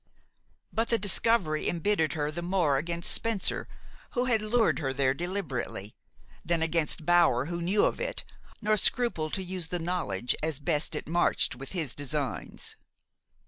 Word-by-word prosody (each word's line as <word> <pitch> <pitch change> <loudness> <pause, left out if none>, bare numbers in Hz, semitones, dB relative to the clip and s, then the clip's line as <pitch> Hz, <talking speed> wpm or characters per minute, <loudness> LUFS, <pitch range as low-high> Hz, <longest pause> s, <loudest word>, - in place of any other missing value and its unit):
But 225 +1 0
the 230 - +3
discovery 205 -6 +3
embittered 170 -1 +1
her 150 -2 -1
the 170 +3 -5
more 175 -6 +2
against 170 +4 -1
Spencer, 225 -4 0 0.5
who 250 -2 +1
had 235 -4 +2
lured 220 +2 +2
her 135 -4 -1
there 135 -1 +2
deliberately, 150 - -4 0.5
than 170 -1 +1
against 165 -1 0
Bower 170 -8 +4
who 170 +2 -4
knew 190 +5 +3
of - - 0
it, - - -2 0.4
nor 215 0 +3
scrupled 195 -8 +1
to 190 - -2
use 180 -2 -3
the 180 - -1
knowledge 165 - -1
as 155 -2 -2
best 150 0 0
it - - -4
marched 175 +2 +2
with 135 +6 -8
his 160 -9 -1
designs. 145 -2 -3
170 Hz, 155 wpm, -29 LUFS, 150-195 Hz, 0.5 s, Bower